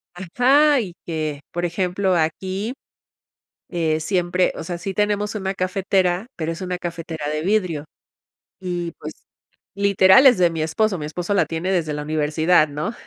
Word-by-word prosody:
Ajá, 260 - +3
y 185 -6 -5
que, 155 -3 -3
por 175 0 -2
ejemplo, 185 +2 0
aquí, 190 +7 -2 1.0
eh, 160 -2 0
siempre, 180 +1 +1
o - - -6
sea, 175 +1 -5
sí, 190 +3 -5
tenemos 210 +1 0
una 195 -1 -3
cafetera, 185 0 0
pero 160 -1 -3
es 165 - -6
una 180 -1 -3
cafetera 165 -3 -5
de 155 - -2
vidrio 180 -6 0 0.8
y 175 -2 -3
pues - - -7 0.6
literal 200 +5 +5
es 250 -3 +7
de 175 -2 +4
mi 160 -1 -3
esposo, 185 +4 0
mi 150 - -5
esposo 175 +5 -4
la 200 - +3
tiene 165 +3 -2
desde 160 -5 0
la 150 - -4
universidad, 155 +2 +2
¿no?, 150 +10 -4
180 Hz, 160 wpm, -21 LUFS, 160-195 Hz, 1.0 s, es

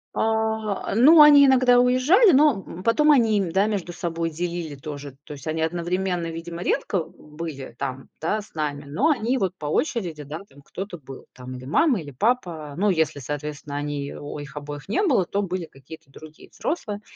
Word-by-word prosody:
А, 220 -2 -1
ну, 300 +7 +8
они 290 -1 +9
иногда 255 -2 +5
уезжали, 260 - +5
но, 280 -8 +4
м, 180 +2 -9
потом 300 +7 +4
они, 225 -6 +4
м, 180 -4 -2
да, 195 +4 +2
между 190 -5 -3
собой 165 -1 -3
делили 170 -1 -4
тоже. 140 -1 -8
То 150 - -9
есть 140 - -11
они 160 0 -2
одновременно, 175 +1 -1
видимо, 170 +1 -7
редко 185 -5 0
были 150 -6 -9
там, 135 -1 -5
да, 210 +7 -1
с 200 - -18
нами, 145 -2 -3
но 230 - +1
они 250 -2 +1
вот 190 -5 -1
по 150 - -6
очереди, 170 - -2
да, 150 +3 -7
там 140 +1 -18
кто-то 190 +1 -7
был, 135 -3 -12
там, 130 0 -9
или 125 0 -9
мама, 230 - +2
или 145 - -9
папа. 165 - -1
Но 205 +5 +1
если, 160 -5 0
соответственно, 145 +1 -6
они 145 -1 -4
о 145 0 -7
их 145 0 -9
обоих 145 +3 -8
не 235 - +1
было, 260 - +2
то 200 +3 -2
были 185 -2 -3
какие-то 150 +1 -14
другие 155 +3 -14
взрослые. 210 -10 -4
170 Hz, 190 wpm, -24 LUFS, 150-220 Hz, -, они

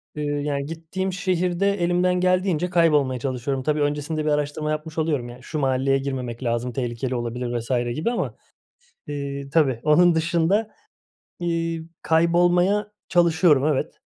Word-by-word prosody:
Eee, 150 - -3
yani, 145 -1 -2
gittiğim 165 +4 -4
şehirde 180 +1 0
elimden 180 +1 +2
geldiğince 180 -1 +1
kaybolmaya 150 -7 +3
çalışıyorum. 130 +1 -2
Tabii, 150 +1 0
öncesinde 150 +2 -1
bir - - +1
araştırma 150 +1 -1
yapmış 155 +1 -5
oluyorum, 150 -6 -1
yani, 120 +1 -12
"Şu 155 +3 -4
mahalleye 135 0 +2
girmemek 130 -3 -4
lazım, 120 +1 -1
tehlikeli 125 0 -3
olabilir." 120 +1 -3
vs. 120 0 -1
gibi 165 +10 -1
ama, 240 - -2 0.8
ııı, 140 -1 -5
tabii. 135 -6 +2
Onun 170 +3 +5
dışında, 170 +6 +1 0.7
iii, 165 -1 -2
kaybolmaya 175 +5 +2 0.2
çalışıyorum, 170 -4 +4
evet. 150 -4 0
150 Hz, 135 wpm, -23 LUFS, 135-175 Hz, 0.8 s, Onun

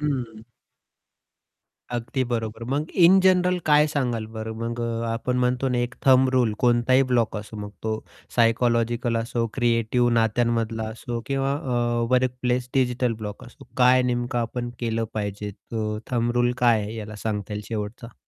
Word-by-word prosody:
हं. 125 -7 -3 1.5
अगदी 120 +2 -2
बरोबर 115 -1 -3
मग 150 +4 -1
इन 185 +3 +8
जनरल 180 -1 +3
काय 150 0 +5
सांगाल 125 -7 -1
बरं 110 0 -5
मग 115 +1 -3
अ, 115 0 -2
आपण 125 +2 -2
म्हणतो 125 +1 +1
ना 125 -1 0
एक 120 +1 -2
थंब 130 0 +6
रूल 120 -4 +2 0.9
असो 105 +1 -11
मग 105 -1 -6
तो 110 - -1 0.4
सायकॉलॉजिकल 115 0 +2
असो, 115 +1 -1
क्रिएटिव, 120 0 +2
नात्यांमधला 115 0 0
असो 115 +1 -5
किंवा 135 0 0
अ, 120 -5 0
वर्क 130 0 +3
प्लेस 125 0 0
डिजिटल 125 -2 +1
ब्लॉक 105 +4 -6
असो 120 - -15
काय 125 0 +5
नेमकं 120 -1 -1
आपण 120 +1 -3
केलं 115 -1 -1
पाहिजे 105 -1 -3
तो 105 +1 -4
थंब 120 -1 +1
रूल 120 0 +2
काय 120 -3 +4
आहे 105 +2 -6
याला 110 -1 -7
सांगता 105 -1 -4
येईल 105 - -4
शेवटचा. 110 +1 -5
120 Hz, 150 wpm, -24 LUFS, 115-125 Hz, 1.5 s, इन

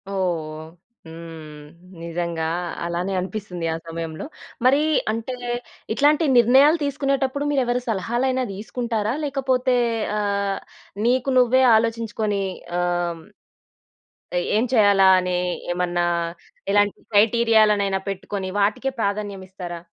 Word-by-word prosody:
ఓహ్! 160 -5 -3 0.4
హ్మ్, 160 -2 -10 0.4
నిజంగా. 170 -1 -3 0.4
అలానే 175 +3 -2
అనిపిస్తుందీ 185 -2 -5
ఆ - - -2
సమయంలో. 165 -1 -5 0.4
మరీ 270 +3 +5 0.3
అంటే, 230 +3 -4 0.6
ఇట్లాంటి 295 +6 +3
నిర్ణయాలు 265 +7 +6
తీసుకునేటప్పుడు, 275 0 -1
మీరెవరి 250 -3 +1
సలహాలైనా 240 +5 0
తీసుకుంటారా? 220 +1 -2
లేకపోతే 260 -2 +1 0.4
ఆహ్, 200 -1 -1 0.5
నీకు 255 +2 +2
నువ్వే 255 +1 +5
ఆలోచించుకొని, 220 -2 0 0.4
ఆహ్, 175 -1 -1 1.2
ఏ - - -1 0.2
ఏం 225 - +2
చేయాలా 200 -4 +5
అని, 180 -1 -1 0.4
ఏమన్నా, 175 -1 0 0.7
ఎలాంటి 205 0 +2
క్రైటీరియాలనైనా 210 -2 +3
పెట్టుకొని 195 0 -4
వాటికే 210 +7 +1
ప్రాధాన్యం 200 -2 -2
ఇస్తారా? 175 -2 -7
205 Hz, 95 wpm, -22 LUFS, 175-245 Hz, 1.2 s, నిర్ణయాలు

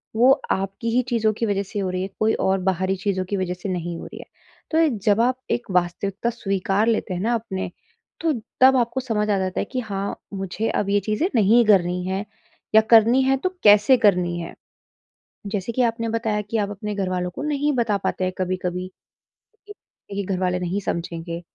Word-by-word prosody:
वो 245 +4 +6 0.2
आपकी 195 +4 -2
ही 250 - +4
चीज़ों 225 -2 +2
की 230 - -2
वज़ह 200 -1 0
से 200 +1 -5
हो 190 -2 -1
रही 185 0 -2
है, 190 - -3
कोई 220 +1 +3
और 190 0 +1
बाहरी 190 +1 0
चीज़ों 190 -1 -1
की 200 - -1
वजह 185 -1 -1
से 180 +2 -6
नहीं 175 -2 -3
हो - - -8
रही - - -10
है। - - -9 0.5
तो 320 0 +4 0.2
जब 210 +2 +4
आप 255 +1 +2
एक 240 0 -1
वास्तविकता 185 +5 0
स्वीकार 195 -1 0
लेते 220 -4 0
हैं 180 - -3
ना 235 +3 +1
अपने, 190 -5 -4 0.5
तो 325 -2 +2 0.3
तब 265 0 +7
आपको 240 +1 0
समझ 215 -4 -1
आ 200 - +2
जाता 185 -1 -2
है - - -3
कि 255 - -2
हाँ, 200 -3 -4 0.2
मुझे 195 +3 -3
अब 200 - -1
ये 205 0 +3
चीज़ें 215 - 0
नहीं 230 +3 +5
करनी 180 -3 +3
है 190 +2 -2 0.5
या 220 - +9
करनी 230 +3 +6
है 270 0 +2
तो 370 +7 -1
कैसे 210 +5 +6
करनी 180 -6 +2
है। 170 - -6 0.9
जैसे 205 +2 -3
कि 255 - +1
आपने 230 -1 -1
बताया 220 -2 -1
कि 210 +2 -3
आप 205 -2 0
अपने 205 +1 -5
घर 190 -2 -1
वालों 180 -1 -1
को - - -5
नहीं 295 -1 0
बता 230 -5 +1
पाते 185 - -1
हैं 185 0 -1
कभी-कभी 185 0 -2 0.8
कि 415 - -9 0.4
नहीं 200 0 -3
घर 185 -1 -2
वाले 180 -1 0
नहीं 180 +2 -2
समझेंगे। 170 0 -4
200 Hz, 210 wpm, -23 LUFS, 185-230 Hz, 0.9 s, या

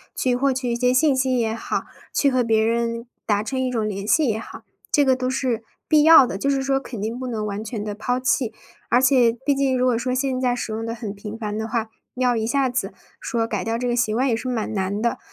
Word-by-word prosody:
去 250 -1 +1
获 275 +2 +2
取 255 -2 -2
一 - - 0
些 250 +1 +2
信 270 +2 +3
息 260 -1 +1
也 225 -2 0
好， 225 - -3 0.3
去 280 - +2
和 255 -1 +2
别 220 -1 +2
人 230 0 -1 0.2
达 205 -1 +2
成 260 +4 -3
一 260 - 0
种 225 -4 -1
联 200 -1 -4
系 315 +6 +4
也 220 -2 0
好， - - -10 0.3
这 290 - +4
个 260 -1 +4
都 255 0 -2
是 255 -3 -1 0.3
必 305 -1 +5
要 320 -3 +8
的， 240 - -4
就 275 - 0
是 270 -1 +1
说 270 0 +1
肯 250 -4 -8
定 225 +4 -3
不 260 - -4
能 220 -3 -3
完 205 0 -4
全 220 -1 -5
地 210 -1 -4
抛 245 +4 -1
弃。 250 -2 +1 0.4
而 245 - +4
且 255 -3 +4
毕 285 - +3
竟 270 -2 +1
如 250 - +2
果 250 -2 +3
说 240 +2 -2
现 260 -1 -1
在 250 -1 +1
使 240 - -4
用 220 +1 -3
得 230 0 -4
很 215 -3 -5
频 210 +2 -8
繁 210 -2 -4
的 220 +1 -3
话， 225 -1 -2 0.3
要 250 -1 +2
一 220 -1 -1
下 270 +2 +2
子 255 - -2 0.3
说 230 -2 -1
改 210 -5 -3
掉 225 0 -1
这 250 +1 -2
个 240 - +1
习 220 -2 +1
惯 260 +4 +2
也 235 - +2
是 255 +3 -4
蛮 225 -3 -2
难 195 0 -1
的。 235 +1 -1
240 Hz, 285 characters per minute, -22 LUFS, 220-260 Hz, 0.4 s, 要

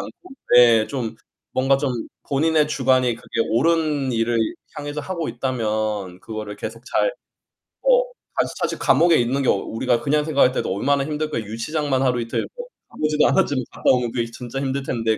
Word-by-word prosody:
않고 365 -7 -12 0.2
예 115 -3 +6
좀 125 -5 -4 0.4
뭔가 135 +1 +3
좀 135 0 -1 0.4
본인의 155 +2 +2
주관이 130 -4 +2
그게 115 - -4
옳은 150 0 +1
일을 115 0 +1 0.4
향해서 145 0 -4
하고 170 -2 -3
있다면 110 -6 -2
그거를 105 -1 -6
계속 115 +2 -7
잘 - - +1 0.7
어 - - +5 0.3
다시 - - +1
사실 - - -1
감옥에 170 -1 +4
있는 130 +4 +1
게 - - -1
어 - - +6
우리가 115 +4 -1
그냥 150 +1 +1
생각할 140 -4 +3
때도 - - -1
'얼마나 140 +7 +1
힘들까?' 150 -2 -2
유치장만 130 +6 -2
하루 125 -2 +1
이틀 115 - -2
뭐 485 - -6 0.2
가 - - -16
보지도 155 0 +3
않았지만 145 -9 +2
갔다 - - 0
오면 125 -2 +1
그게 120 -1 -1
진짜 125 +2 -6
힘들 135 0 -2
텐데. 115 -4 0
130 Hz, 355 characters per minute, -22 LUFS, 115-150 Hz, 0.7 s, 예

